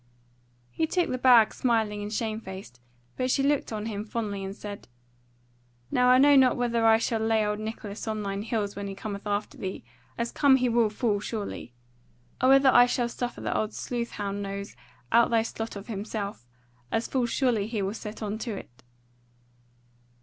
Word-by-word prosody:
He 320 - 0
took 355 +1 0
the 255 - -2
bag 245 -4 +6
smiling 220 -4 0
and 205 0 -5
shame 220 0 -2
faced, 190 - -9 0.4
but 255 0 0
she 270 - +2
looked 285 -2 +1
on 215 -1 -4
him 210 -2 -3
fondly 210 -3 -4
and 195 +1 -5
said: 205 -1 -8 1.0
"Now 250 0 +4
I 255 - +7
know 285 +2 +6
not 260 -2 +5
whether 235 -2 +1
I 220 0 +7
shall 225 0 -1
lay 220 -1 +2
old 210 0 -1
Nicholas 215 -1 -6
on 215 -1 -2
thine 200 0 -3
heels 210 -2 -2
when 200 0 -5
he 195 - -6
cometh 200 +1 -6
after 205 0 -2
thee, 190 -1 -5 0.3
as 235 0 -2
come 280 -2 +5
he 250 -1 +2
will 230 -2 +3
full 210 -1 0
surely; 205 - -5 0.7
or 255 - +4
whether 270 0 +7
I 245 0 +7
shall 245 -1 0
suffer 245 0 -5
the - - -2
old 215 0 -1
sleuth 240 -1 -4
hound 200 -1 -3
nose 200 0 -5 0.4
out 235 +1 +5
thy 230 -1 +3
slot 225 0 -5
of 200 0 -7
himself, 205 - -5 0.4
as 225 - 0
full 255 -3 0
surely 235 -4 +1
he 220 -3 -2
will 195 +1 -2
set 220 0 -7
on 210 +1 -3
to 225 -2 -4
it." 120 -6 -12
220 Hz, 190 wpm, -27 LUFS, 205-240 Hz, 1.0 s, I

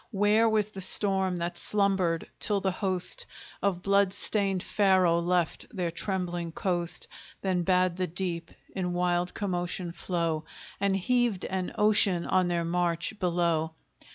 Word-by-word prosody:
Where 210 +1 +3
was 215 -1 +1
the 195 - -7
storm 190 -1 +3
that 175 0 -3
slumbered 190 -5 +1
till 205 -2 +1
the 190 -1 0
host 185 -1 0 0.3
Of 190 -3 0
blood 200 -1 +3
stained 195 -3 -1
Pharaoh 185 -4 +3
left 175 -1 0
their 180 -4 -2
trembling 175 -2 -3
coast; 175 -2 -1 0.4
Then 185 -2 +1
bade 180 0 +2
the 185 -1 -1
deep 170 -1 -3 0.3
in 180 -2 -2
wild 175 0 0
commotion 180 -2 -2
flow, 170 -2 -2 0.4
And 200 -1 +1
heaved 235 0 +1
an 185 -1 -3
ocean 205 -4 +3
on 185 -1 +2
their 170 -1 0
march 170 +1 -1
below? 170 -3 0
180 Hz, 140 wpm, -28 LUFS, 175-195 Hz, 0.4 s, Where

